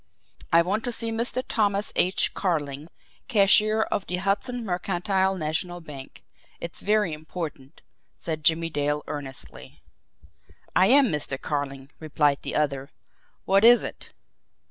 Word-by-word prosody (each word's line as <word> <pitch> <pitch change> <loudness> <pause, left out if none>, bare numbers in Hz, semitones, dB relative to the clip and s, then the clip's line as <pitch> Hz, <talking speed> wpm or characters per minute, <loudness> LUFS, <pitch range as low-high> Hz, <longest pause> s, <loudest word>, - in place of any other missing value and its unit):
"I 165 0 +6
want 205 +6 -1
to 245 - -1
see 230 -1 -2
Mr. 235 +3 -1
Thomas 205 -2 0
H. 185 +2 +2
Carling, 150 -5 -2 0.4
cashier 215 0 +4
of 200 - -3
the 180 - -2
Hudson 205 +6 -1
Mercantile 190 +1 0
National 175 +2 -2
Bank 145 -5 -11 0.4
it's 170 - -5
very 210 -4 +1
important," 150 -3 -7 0.3
said 155 -2 -5
Jimmie 165 +1 +2
Dale 145 0 -1
earnestly. 135 -3 -7 0.9
"I 185 - +5
am 265 +1 +6
Mr. 145 -4 -3
Carling," 140 -2 -4
replied 150 -2 +1
the - - -5
other. 140 -2 -1 0.6
"What 195 +2 +3
is 240 +1 +7
it?" - - -7
175 Hz, 130 wpm, -25 LUFS, 150-205 Hz, 0.9 s, is